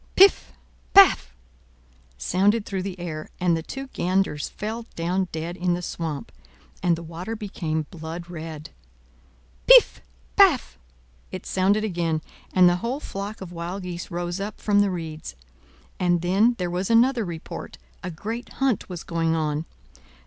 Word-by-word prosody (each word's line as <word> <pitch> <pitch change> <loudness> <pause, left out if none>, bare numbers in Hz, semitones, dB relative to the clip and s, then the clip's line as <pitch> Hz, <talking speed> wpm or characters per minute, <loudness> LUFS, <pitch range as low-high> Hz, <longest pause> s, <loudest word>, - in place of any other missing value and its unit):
"Piff! 390 +1 +6 0.4
paff!" 385 - +7 0.8
resounded 200 - +2
through 195 -2 -3
the 185 -1 -5
air; 155 -3 -5
and 175 -2 +3
the 165 - -2
two 270 +11 -6
ganders 180 -5 0
fell 225 +2 -5
down 180 +3 0
dead 165 +2 -4
in 180 -1 +1
the 180 - -5
swamp, 160 -5 -4 0.5
and 175 -1 +3
the 170 - -8
water 170 +7 -6
became 165 -7 -3
blood 170 0 -7
red. 160 -3 -7 1.0
"Piff - - +7 0.3
paff!" 345 - +4 0.5
it 185 - -6
sounded 200 +3 +2
again, 170 -6 -1 0.3
and 180 -1 +6
the 175 0 +3
whole 235 +8 -3
flock 200 -5 -6
of 185 -2 -7
wild 175 +3 -5
geese 175 -1 -6
rose 175 +1 -3
up 205 +2 -5
from 205 -1 +2
the 205 - +2
reeds. 160 - -6 0.6
And 175 -1 +2
then 205 +7 +3
there 180 -2 -2
was 180 +2 -2
another 235 +1 +4
report. 170 -4 -7 0.2
A 180 - -4
great 220 +8 -6
hunt 270 -7 0
was 175 -2 -6
going 165 -1 0
on. 155 0 -1
180 Hz, 150 wpm, -24 LUFS, 165-205 Hz, 1.0 s, paff